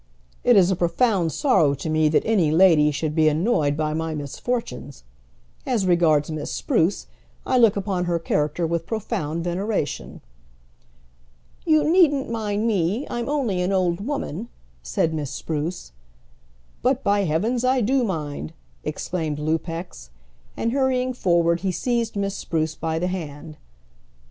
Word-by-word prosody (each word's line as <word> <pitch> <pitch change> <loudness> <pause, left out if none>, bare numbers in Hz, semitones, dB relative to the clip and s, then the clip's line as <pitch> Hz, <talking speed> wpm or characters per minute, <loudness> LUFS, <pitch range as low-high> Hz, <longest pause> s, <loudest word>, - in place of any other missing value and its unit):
It 245 - +5
is 190 -2 +5
a - - +2
profound 175 0 +1
sorrow 155 - +3
to 140 - -6
me 155 0 +2
that 155 - +2
any 200 -8 +2
lady 160 -2 +5
should 150 +1 -2
be 155 -1 +4
annoyed 155 -3 +1
by 155 -1 -1
my 160 0 -2
misfortunes. 145 - -4 0.6
As 230 -7 0
regards 165 -4 +3
Miss 155 -1 -4
Spruce, 170 +5 0 0.4
I 255 - +2
look 225 -4 +5
upon 190 -3 -1
her 175 -1 0
character 155 0 -1
with 165 0 -2
profound 170 -7 -3
veneration." 180 -1 -3 1.5
"You 310 -2 +4
needn't 300 -7 +3
mind 215 -1 -1
me; 205 - 0
I'm 240 +2 -3
only 245 -11 0
an 180 +2 0
old 185 -1 0
woman," 235 - -4 0.3
said 65 - -1
Miss 150 -4 -3
Spruce. 155 - -4 0.9
"But, 260 +2 +1
by 200 0 +2
heavens, 220 +10 0
I 255 0 +2
do 255 +4 +2
mind!" 155 -6 -4 0.3
exclaimed 155 0 -3
Lupex; 160 - -4 0.5
and 230 - 0
hurrying 255 -1 +1
forward 170 -6 +2
he 190 +1 -1
seized 235 +3 -1
Miss 200 -1 -1
Spruce 160 -1 -2
by 160 0 -3
the 170 - -1
hand. 155 -4 -5
175 Hz, 145 wpm, -23 LUFS, 155-225 Hz, 1.5 s, It